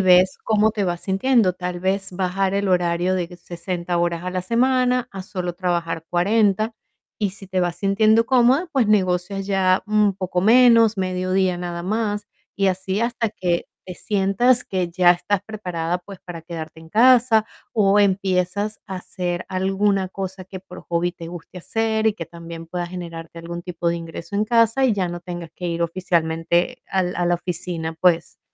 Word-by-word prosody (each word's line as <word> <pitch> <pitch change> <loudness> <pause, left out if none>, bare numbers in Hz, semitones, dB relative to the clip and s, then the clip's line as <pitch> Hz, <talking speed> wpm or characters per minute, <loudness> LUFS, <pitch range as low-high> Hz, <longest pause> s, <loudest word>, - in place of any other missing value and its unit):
ves 185 0 +5
cómo 215 0 +2
te 215 -2 -2
vas 175 -2 -2
sintiendo. 200 +1 +2
Tal 180 0 -5
vez, 195 +1 -1
bajar 190 +1 -1
el 200 0 0
horario 180 0 +1
de 175 -2 -2
60 175 0 -4
horas 170 0 0
a 180 - -2
la 185 0 -2
semana 250 +3 +2
a 195 -1 -6
solo 180 -2 -4
trabajar 170 -2 -2
40 210 +4 +2 0.4
y, 205 -3 -1
si 195 +1 -12
te 185 0 -1
vas 175 -1 -1
sintiendo 215 +4 +3
cómoda, 260 +7 +3
pues 255 -6 +2
negocias 190 -1 +1
ya 190 -2 +2
un 210 -2 +2
poco 180 -1 -1
menos, 230 +1 +6
mediodía 185 0 0
nada 175 -1 -5
más 210 0 -1 0.3
y 195 - +2
así, 190 +1 -1
hasta 235 0 0
que 175 -4 -1 0.2
te 180 - -8
sientas 205 +7 +2
que 185 -2 -2
ya 175 0 +5
estás 195 +2 -1
preparada, 180 -5 -3
pues, 190 +2 -12
para 170 -3 -9
quedarte 160 -1 -8
en 160 - -14
casa, 230 +1 +5 0.3
o 205 -1 +4
empiezas 195 +1 0
a 190 - -4
hacer 180 -1 -4
alguna 195 +1 +1
cosa 190 0 -6
que 190 +1 -8
por 180 -1 -12
hobby 175 +1 -1
te 170 -2 -9
guste 175 +1 -9
hacer 220 +3 0
y, 215 - -1
que 165 -6 -6
también 170 -1 -9
pueda 175 +1 -4
generarte 170 -2 -8
algún 170 +1 -6
tipo 175 -1 -5
de 170 - +1
ingreso 170 +2 -8
en 205 +1 +2
casa 230 +3 +3
y 255 - +4
ya 195 -3 0
no 175 0 -5
tengas 175 -2 -7
que 180 - -5
ir 170 0 -1
oficialmente 170 +4 0
al 185 -2 0
a 175 - 0
la 175 - +3
oficina, 175 -2 -4
pues, 170 -2 +2
185 Hz, 180 wpm, -22 LUFS, 175-205 Hz, 0.4 s, menos